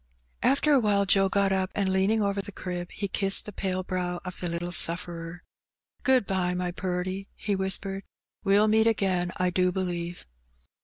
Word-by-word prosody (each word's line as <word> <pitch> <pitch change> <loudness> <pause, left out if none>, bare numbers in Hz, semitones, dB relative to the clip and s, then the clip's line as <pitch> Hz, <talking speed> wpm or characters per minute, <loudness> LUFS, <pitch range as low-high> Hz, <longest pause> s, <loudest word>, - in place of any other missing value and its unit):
After 280 +2 +3
awhile 210 -6 +3
Joe 195 0 +3
got 200 0 +2
up, 190 -1 0
and 190 -2 +1
leaning 205 +3 +2
over 200 0 0
the 200 +1 -7
crib, 180 -2 -5
he 200 - -3
kissed 195 +1 +2
the 210 - -8
pale 185 -1 -2
brow 180 -1 -3
of 180 - -7
the 175 - -2
little 170 +1 -3
sufferer. 170 0 0 0.3
" - - -48
Good 260 -5 +4
bye, 180 -2 0
my 180 0 -2
purty, 185 +2 -3
he 205 -1 -2
whispered. 195 0 -1 0.4
"We*ll 205 +2 +4
meet 220 +1 +4
again, 185 -5 +1
I 180 -1 +1
do 180 0 +2
believe." 175 -2 -4
190 Hz, 175 wpm, -27 LUFS, 180-200 Hz, 0.4 s, Good